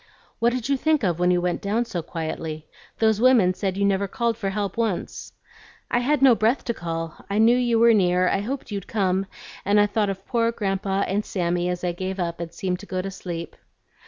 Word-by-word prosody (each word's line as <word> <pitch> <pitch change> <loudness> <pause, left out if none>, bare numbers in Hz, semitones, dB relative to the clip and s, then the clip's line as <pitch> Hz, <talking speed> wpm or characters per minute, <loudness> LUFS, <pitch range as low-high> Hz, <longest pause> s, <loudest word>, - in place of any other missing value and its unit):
"What 235 +1 +3
did 250 -1 -3
you 275 -1 +2
think 310 -1 +1
of 175 -3 0
when 180 0 +3
you 180 0 +3
went 175 0 -1
down 220 +4 0
so 175 -7 -4
quietly? 160 -1 -5 0.3
Those 220 -1 +2
women 235 -8 +5
said 190 0 -3
you 200 - +2
never 200 0 +1
called 235 +2 -1
for 200 -3 -3
help 200 -1 -3
once." 225 -6 -3 0.6
"I 240 - +3
had 270 +3 +1
no 265 -2 +8
breath 225 +4 +1
to 235 - -1
call. 165 -4 -5
I 200 - -1
knew 225 +2 +5
you 240 -2 +2
were 230 0 +6
near, 180 -3 +3
I 195 - +1
hoped 255 +4 -5
you'd 200 -2 -4
come, 190 -2 0 0.4
and 205 +2 +3
I 205 - +6
thought 210 0 0
of 195 0 -5
poor 230 -1 +1
Grandpa 195 -2 -1
and 200 +3 -1
Sammy 175 -2 -1
as 180 0 -3
I 180 - +1
gave 185 +2 -4
up 170 -1 -2
and 170 -1 -5
seemed 180 +1 -3
to 205 - -11
go 185 - -3
to 195 - -4
sleep." 170 -3 -6
195 Hz, 225 wpm, -24 LUFS, 180-230 Hz, 0.6 s, no